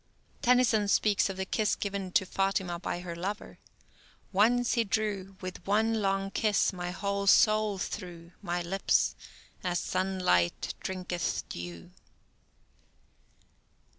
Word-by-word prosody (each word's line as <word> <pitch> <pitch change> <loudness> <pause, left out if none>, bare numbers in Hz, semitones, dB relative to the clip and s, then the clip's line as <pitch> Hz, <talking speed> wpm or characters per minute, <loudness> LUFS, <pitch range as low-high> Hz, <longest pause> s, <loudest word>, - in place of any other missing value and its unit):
Tennyson 240 -4 +4
speaks 205 0 +3
of 190 - -5
the 190 - -2
kiss 210 +2 +1
given 200 -2 -4
to 190 - +3
Fatima 190 -2 -1
by 175 0 -3
her 175 -2 -6
lover: 195 +5 -5 0.7
Once 240 +5 +3
he 235 - +3
drew 200 -2 -2
With 185 -1 -7
one 220 +2 +2
long 195 0 0
kiss 210 -2 +2
my 175 -1 -4
whole 200 +2 -2
soul 215 0 +5
through 175 -3 -6
My 175 -3 -2
lips—as 180 0 -1
sunlight 185 - 0
drinketh 180 -2 -3
dew. 85 -1 -7
195 Hz, 115 wpm, -30 LUFS, 180-210 Hz, 0.7 s, soul